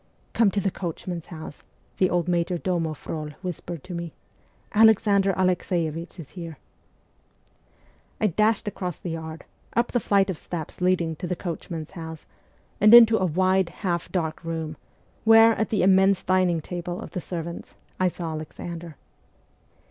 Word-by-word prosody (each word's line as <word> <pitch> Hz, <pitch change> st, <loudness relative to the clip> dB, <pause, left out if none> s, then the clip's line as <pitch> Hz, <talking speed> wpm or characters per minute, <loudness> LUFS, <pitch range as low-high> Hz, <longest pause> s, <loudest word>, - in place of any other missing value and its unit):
' -, -, -37 dB
Come 225 Hz, -3 st, +4 dB
to 200 Hz, -, -1 dB
the 195 Hz, 0 st, 0 dB
coachmen's 175 Hz, -1 st, -5 dB
house,' 155 Hz, -3 st, -9 dB, 0.3 s
the 185 Hz, -, +3 dB
old 175 Hz, -1 st, 0 dB
major 175 Hz, 0 st, +1 dB
domo 170 Hz, -3 st, -1 dB
Frol 155 Hz, 0 st, -5 dB
whispered 175 Hz, -3 st, -5 dB
to 180 Hz, -, -8 dB
me. 170 Hz, -1 st, -5 dB, 0.3 s
' -, -, -32 dB
Alexander 200 Hz, -3 st, +5 dB
Alexeievich 175 Hz, -2 st, -1 dB
is 150 Hz, -4 st, -9 dB
here.' 165 Hz, -4 st, -8 dB, 1.6 s
I -, -, +1 dB
dashed 215 Hz, +3 st, +2 dB
across 180 Hz, -4 st, -4 dB
the 175 Hz, -, -6 dB
yard, 160 Hz, 0 st, -6 dB, 0.3 s
up 235 Hz, +1 st, +1 dB
the 245 Hz, -, +2 dB
flight 200 Hz, -2 st, +2 dB
of 170 Hz, -, -7 dB
steps 170 Hz, 0 st, -6 dB
leading 175 Hz, -3 st, +1 dB
to 180 Hz, -, -5 dB
the 180 Hz, -, -1 dB
coachmen's 165 Hz, -2 st, -6 dB
house, 160 Hz, -3 st, -8 dB, 0.5 s
and 215 Hz, +3 st, +8 dB
into 230 Hz, -2 st, +8 dB
a 185 Hz, -, +2 dB
wide, 185 Hz, +2 st, +2 dB
half 175 Hz, -1 st, -3 dB
dark 160 Hz, -3 st, -2 dB
room, 160 Hz, -2 st, -4 dB, 0.5 s
where, 225 Hz, 0 st, +7 dB
at 220 Hz, -, -1 dB
the 210 Hz, -, +1 dB
immense 190 Hz, 0 st, +4 dB
dining 185 Hz, -3 st, +2 dB
table 175 Hz, +2 st, -5 dB
of -, -, -8 dB
the 180 Hz, -, -4 dB
servants, 170 Hz, -1 st, -6 dB, 0.2 s
I 185 Hz, -, +3 dB
saw 170 Hz, -2 st, -4 dB
Alexander. 165 Hz, +1 st, -7 dB
175 Hz, 160 wpm, -25 LUFS, 165-190 Hz, 1.6 s, and